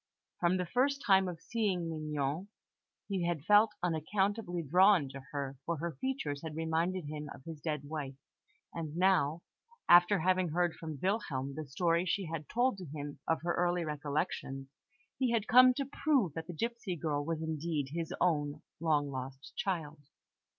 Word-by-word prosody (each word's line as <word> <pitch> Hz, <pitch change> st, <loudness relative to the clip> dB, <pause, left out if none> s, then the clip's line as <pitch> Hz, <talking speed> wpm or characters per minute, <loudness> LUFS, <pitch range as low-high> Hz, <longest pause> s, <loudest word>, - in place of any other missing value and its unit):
From 175 Hz, +1 st, +3 dB
the 180 Hz, -, -1 dB
first 275 Hz, +8 st, +1 dB
time 190 Hz, -1 st, +5 dB
of 175 Hz, -2 st, -5 dB
seeing 195 Hz, -4 st, -1 dB
Mignon, 155 Hz, +1 st, -2 dB, 0.6 s
he 190 Hz, -4 st, -1 dB
had 165 Hz, -4 st, -2 dB
felt 210 Hz, +2 st, +5 dB
unaccountably 180 Hz, +2 st, 0 dB
drawn 180 Hz, +1 st, +5 dB
to 135 Hz, +1 st, -8 dB
her, 140 Hz, -2 st, -4 dB
for 170 Hz, -1 st, -2 dB
her 170 Hz, +3 st, -3 dB
features 255 Hz, -, -2 dB
had 160 Hz, -2 st, -6 dB
reminded 165 Hz, +2 st, 0 dB
him 150 Hz, 0 st, -5 dB
of -, -, -11 dB
his 160 Hz, -1 st, -8 dB
dead 150 Hz, -3 st, -2 dB
wife; 145 Hz, -2 st, -5 dB, 0.6 s
and 160 Hz, -1 st, -5 dB
now, 175 Hz, -4 st, +3 dB, 0.4 s
after 175 Hz, +3 st, +7 dB
having 185 Hz, 0 st, +2 dB
heard 175 Hz, +1 st, +1 dB
from 160 Hz, -3 st, -7 dB
Wilhelm 145 Hz, -, -1 dB
the 155 Hz, +1 st, -6 dB
story 170 Hz, +5 st, +1 dB
she 190 Hz, +3 st, 0 dB
had 160 Hz, -2 st, -5 dB
told 245 Hz, -3 st, +1 dB
to 185 Hz, -, -7 dB
him 145 Hz, -1 st, -7 dB
of 165 Hz, 0 st, 0 dB
her 175 Hz, 0 st, +1 dB
early 175 Hz, -1 st, +1 dB
recollections, 145 Hz, -2 st, -3 dB, 0.5 s
he 260 Hz, -2 st, +2 dB
had 220 Hz, -2 st, 0 dB
come 255 Hz, +2 st, +8 dB
to 275 Hz, -, -1 dB
prove 275 Hz, -, +1 dB
that 160 Hz, +1 st, -6 dB
the 175 Hz, -, -5 dB
gipsy 230 Hz, 0 st, -3 dB
girl 150 Hz, -3 st, -1 dB
was 160 Hz, +1 st, -2 dB
indeed 155 Hz, -3 st, -2 dB
his 165 Hz, 0 st, -3 dB
own 150 Hz, -3 st, +1 dB, 0.2 s
long 150 Hz, -3 st, +1 dB
lost 130 Hz, +1 st, -7 dB
child. 160 Hz, -6 st, -2 dB
165 Hz, 170 wpm, -33 LUFS, 150-185 Hz, 0.6 s, come